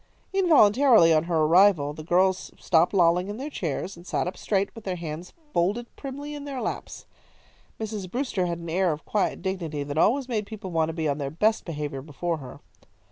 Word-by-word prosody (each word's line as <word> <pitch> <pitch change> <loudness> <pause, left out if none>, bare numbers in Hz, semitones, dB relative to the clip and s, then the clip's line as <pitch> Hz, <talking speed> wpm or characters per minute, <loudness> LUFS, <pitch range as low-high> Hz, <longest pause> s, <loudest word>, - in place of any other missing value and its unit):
Involuntarily 260 - +5
on 155 +1 +2
her 165 -2 +1
arrival 165 -3 +4
the 155 +1 -9
girls 185 +3 +1
stopped 170 0 +3
lolling 180 -1 +3
in 205 +1 -5
their 285 +4 -5
chairs, 175 - -3
and 170 +2 -14
sat - - 0
up 180 - -4
straight, 200 -1 -1
with 225 - -11
their 185 -3 -2
hands 170 +1 -6 0.2
folded 205 +8 0
primly 285 +2 -7
in 290 -1 -7
their 280 -2 -5
laps. - - -5 0.7
Mrs. 210 -4 -4
Brewster 230 -5 -1
had 170 -1 -2
an 170 0 -8
air 180 0 +2
of 150 0 -6
quiet 210 - -1
dignity 170 -7 -3
that 145 +2 -3
always 255 +8 +3
made 215 -5 -2
people 215 -4 -7
want 160 -1 +1
to - - -4
be 160 -1 -2
on 145 0 -1
their 140 -1 -2
best 215 +9 +1
behaviour 150 -4 -4
before 160 +4 -3
her. 135 -4 -11
180 Hz, 200 wpm, -26 LUFS, 160-215 Hz, 0.7 s, Involuntarily